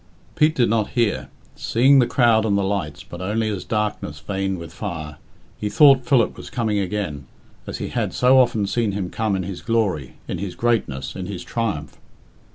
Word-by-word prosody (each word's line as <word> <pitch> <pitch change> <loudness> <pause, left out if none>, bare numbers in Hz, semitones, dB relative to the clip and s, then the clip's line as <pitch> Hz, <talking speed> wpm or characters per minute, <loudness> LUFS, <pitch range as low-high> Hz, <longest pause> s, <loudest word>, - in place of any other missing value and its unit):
Pete 155 +1 +3
did 120 - +3
not 110 -1 +1
hear. 115 -3 +1 0.3
Seeing 135 +4 +4
the 120 - +4
crowd 115 -3 +3
and 100 -2 +1
the 100 - +1
lights, 95 -6 -2
but 85 - -9
only 110 +4 -1
as 100 -4 -3
darkness 105 -8 -2
veined 95 +1 -2
with 85 -1 -9
fire, 80 -7 -6 0.4
he 105 - -2
thought 135 +3 +6
Philip 130 -7 +3
was - - -10
coming 110 -5 0
again, 90 -8 -3 0.4
as - - -4
he - - -4
had - - -1
so 130 +1 +5
often 115 -5 +2
seen 110 0 0
him 95 -3 -3
come 110 -3 0
in 95 - -2
his 95 0 -6
glory, 100 - -1
in - - -4
his 95 -1 -5
greatness, 110 - -1
in 95 -1 -5
his 95 -3 -6
triumph. 100 -10 -3
105 Hz, 190 wpm, -22 LUFS, 90-115 Hz, 0.4 s, thought